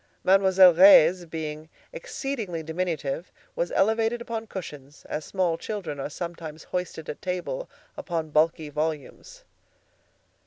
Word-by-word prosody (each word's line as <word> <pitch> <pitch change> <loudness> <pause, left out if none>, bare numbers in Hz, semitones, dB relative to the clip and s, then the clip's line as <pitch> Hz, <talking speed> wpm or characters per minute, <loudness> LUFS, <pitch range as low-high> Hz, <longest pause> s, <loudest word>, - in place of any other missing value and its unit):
Mademoiselle 190 -1 +6
Reisz, 180 -1 +7
being 155 -1 -6 0.2
exceedingly 235 - -4
diminutive, 160 -2 -3 0.2
was - - -2
elevated 225 +3 +2
upon 230 -1 -5
cushions, 145 -7 -9
as 150 - -4
small 175 -1 -1
children 190 -9 -5
are 135 - -4
sometimes 165 -1 -7
hoisted 180 -3 -5
at - - -7
table 185 - -4 0.3
upon 165 -3 -4
bulky 155 0 +1
volumes. 160 - -4
175 Hz, 115 wpm, -26 LUFS, 155-195 Hz, 0.3 s, Reisz